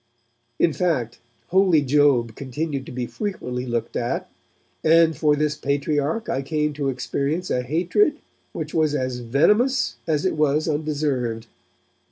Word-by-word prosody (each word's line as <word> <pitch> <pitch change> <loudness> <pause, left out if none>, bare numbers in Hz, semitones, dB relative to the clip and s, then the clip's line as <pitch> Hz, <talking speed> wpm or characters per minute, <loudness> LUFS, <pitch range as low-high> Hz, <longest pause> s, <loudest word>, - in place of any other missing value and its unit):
In 165 - +3
fact, 145 - -1 0.3
Holy 185 -5 +4
Job 135 -5 +3
continued 140 +1 -4
to - - -8
be 125 -1 -3
frequently 125 - -4
looked 120 -1 -3
at, - - -2 0.5
and 160 0 +5
for 150 -2 +2
this 150 0 0
Patriarch 145 - -1
I 135 - -1
came 150 +1 -1
to 145 -2 -2
experience 140 +6 -2
a 125 - +1
hatred 180 - +1 0.3
which 155 -1 -6
was 155 -2 +2
as 130 -3 -2
venomous 145 - +2
as 150 0 0
it 185 - +2
was 150 0 +1
undeserved. 145 -7 -1
150 Hz, 140 wpm, -23 LUFS, 130-160 Hz, 0.5 s, and